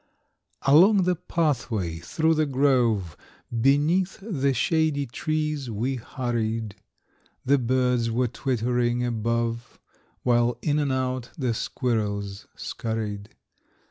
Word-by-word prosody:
Along 185 +8 +6
the 180 0 +2
pathway, 125 - -1
through 160 - +1
the 155 -1 +1
grove, 125 - +2 0.5
Beneath 150 +8 +2
the 155 -10 0
shady 155 +2 +1
trees, 150 +1 -2
we 120 +5 -2
hurried. 115 -3 -3 0.7
The 140 +1 +4
birds 125 -1 +1
were 125 +2 +1
twittering 120 0 0
above, 115 0 -2 0.4
While 120 -1 +2
in 150 -1 +1
and 145 -2 0
out 130 -1 -2
the 130 -5 0
squirrels 105 -5 -2
scurried. 105 -2 -4
125 Hz, 105 wpm, -25 LUFS, 115-145 Hz, 0.7 s, Along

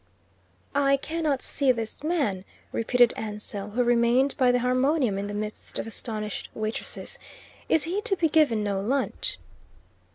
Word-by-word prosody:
"I 275 -1 +4
cannot 310 -2 -1
see 275 -2 +2
this 230 -3 -4
man," 280 - 0 0.3
repeated 245 +1 +3
Ansell, 210 -1 -5
who 245 +4 +1
remained 240 +3 +3
by 255 -2 +4
the 245 - +3
harmonium 255 -2 +2
in 200 - -3
the 205 - -5
midst 210 0 -5
of - - -2
astonished 215 -1 -5
waitresses. 220 0 -4 0.5
"Is 320 - +4
he 365 +5 -1
to 420 -3 0
be 335 -3 +2
given 295 -9 +3
no 200 -2 0
lunch?" 260 +6 -1
245 Hz, 150 wpm, -26 LUFS, 215-280 Hz, 0.5 s, I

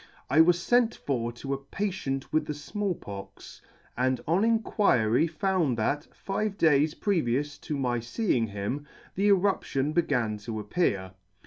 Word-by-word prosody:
I 155 - +7
was 175 +1 +3
Tent 240 -1 +3
for 120 -4 -2
to 135 +3 -4
a 135 - -3
patient 140 -4 -3
with 155 -1 +1
the 150 - -3
Small 195 +5 -3
Pox, 100 -7 -10 0.3
and 130 +1 +1
on 175 +6 +3
inquiry 180 - +3
found 170 - 0
that, 145 +7 -1
five 200 +1 -3
days 155 -1 +3
previous 145 - 0
to 150 - -4
my 125 -3 0
feeing 120 - 0
him, 105 +9 -4 0.3
the 200 +2 +1
eruption 180 -8 +2
began 120 -10 +1
to 110 +1 -5
appear. 105 - -1
145 Hz, 145 wpm, -28 LUFS, 120-190 Hz, 0.3 s, I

